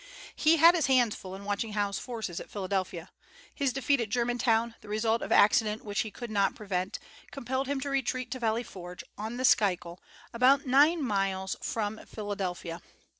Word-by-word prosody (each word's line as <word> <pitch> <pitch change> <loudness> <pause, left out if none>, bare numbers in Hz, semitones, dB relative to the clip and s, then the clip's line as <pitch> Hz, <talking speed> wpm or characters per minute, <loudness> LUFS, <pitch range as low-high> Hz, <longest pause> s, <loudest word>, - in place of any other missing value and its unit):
He 325 +1 +4
had 335 +2 +8
his 330 -5 +1
hands 250 -5 +3
full 190 0 -8
in 200 +1 -10
watching 205 +2 -2
Howe's 205 -1 -1
forces 220 -8 -5
at - - -10
Philadelphia. 185 -4 -3 0.4
His 280 -3 0
defeat 270 0 +1
at 220 - -3
Germantown, 235 0 +1
the - - -15
result 220 +2 +1
of - - -5
accident 215 +1 +4
which 205 0 -3
he 220 - 0
could 235 +2 -8
not 200 -2 +1
prevent, 195 -1 -3 0.3
compelled 265 0 -3
him 280 0 -1
to 285 - -3
retreat 255 -2 -1
to 255 - -4
Valley 230 0 0
Forge, 180 -4 -9
on 220 +3 -5
the 255 - 0
Schuylkill, 180 -7 +2 0.3
about 260 +4 +4
nine 290 +5 +4
miles 195 -4 -1
from 220 -1 -3
Philadelphia. 190 -5 -4
220 Hz, 175 wpm, -29 LUFS, 200-255 Hz, 0.4 s, had